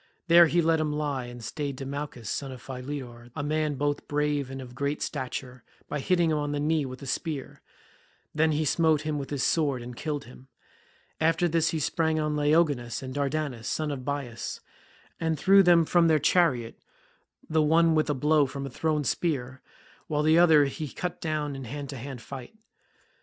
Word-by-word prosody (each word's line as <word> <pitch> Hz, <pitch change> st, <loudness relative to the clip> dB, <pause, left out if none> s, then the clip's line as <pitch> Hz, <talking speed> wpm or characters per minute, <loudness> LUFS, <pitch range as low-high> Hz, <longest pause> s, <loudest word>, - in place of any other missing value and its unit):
There 170 Hz, 0 st, +8 dB
he 170 Hz, +1 st, +2 dB
let 160 Hz, 0 st, +3 dB
him 155 Hz, -1 st, 0 dB
lie 145 Hz, -4 st, -2 dB
and 120 Hz, -1 st, -9 dB
stayed 140 Hz, +4 st, -4 dB
Demouchus 135 Hz, -3 st, -6 dB
son 135 Hz, +5 st, -3 dB
of 130 Hz, -, -8 dB
Philetor, 125 Hz, -2 st, -7 dB
a 145 Hz, -, -3 dB
man 155 Hz, 0 st, 0 dB
both 145 Hz, +1 st, -2 dB
brave 145 Hz, -2 st, 0 dB
and 135 Hz, 0 st, -6 dB
of 125 Hz, -2 st, -9 dB
great 140 Hz, +3 st, -2 dB
stature, 125 Hz, -2 st, -5 dB, 0.2 s
by 150 Hz, -, -3 dB
hitting 170 Hz, +1 st, +2 dB
him 155 Hz, -, +1 dB
on 145 Hz, 0 st, -2 dB
the 145 Hz, -, -1 dB
knee 150 Hz, -1 st, +1 dB
with 130 Hz, +2 st, -9 dB
a -, -, -6 dB
spear; 145 Hz, +1 st, -4 dB, 0.7 s
then 155 Hz, +1 st, +3 dB
he 155 Hz, +1 st, 0 dB
smote 160 Hz, 0 st, +3 dB
him 155 Hz, -1 st, -2 dB
with 135 Hz, -, -6 dB
his 140 Hz, -2 st, -2 dB
sword 145 Hz, -6 st, +1 dB
and 120 Hz, 0 st, -8 dB
killed 145 Hz, +1 st, -3 dB
him. 125 Hz, +1 st, -15 dB, 0.7 s
After 165 Hz, +2 st, +2 dB
this 165 Hz, 0 st, +2 dB
he 160 Hz, -, -1 dB
sprang 160 Hz, +1 st, 0 dB
on 150 Hz, -1 st, 0 dB
Laogonus 145 Hz, -5 st, +1 dB
and 130 Hz, 0 st, -6 dB
Dardanus, 140 Hz, -4 st, -2 dB
sons 155 Hz, +2 st, -1 dB
of 135 Hz, -3 st, -5 dB
Bias, 135 Hz, -4 st, -4 dB, 0.6 s
and 160 Hz, -1 st, 0 dB
threw 195 Hz, +4 st, +6 dB
them 175 Hz, -3 st, +5 dB
from 170 Hz, +1 st, +4 dB
their 160 Hz, -1 st, +5 dB
chariot, 145 Hz, -6 st, +2 dB, 0.7 s
the 160 Hz, 0 st, +2 dB
one 165 Hz, +2 st, +4 dB
with 155 Hz, -1 st, +2 dB
a 145 Hz, -, +1 dB
blow 150 Hz, +1 st, +3 dB
from 140 Hz, +1 st, -6 dB
a 135 Hz, -, -6 dB
thrown 155 Hz, +2 st, 0 dB
spear, 130 Hz, -5 st, -2 dB, 0.5 s
while 150 Hz, -1 st, 0 dB
the 160 Hz, +2 st, +5 dB
other 160 Hz, -4 st, +6 dB
he 150 Hz, +3 st, -4 dB
cut 180 Hz, +5 st, -5 dB
down 150 Hz, -3 st, -2 dB
in 135 Hz, -1 st, -7 dB
hand 140 Hz, +3 st, -6 dB
to 135 Hz, -, -6 dB
hand 130 Hz, 0 st, -7 dB
fight. 135 Hz, -, -9 dB
145 Hz, 195 wpm, -27 LUFS, 135-155 Hz, 0.7 s, There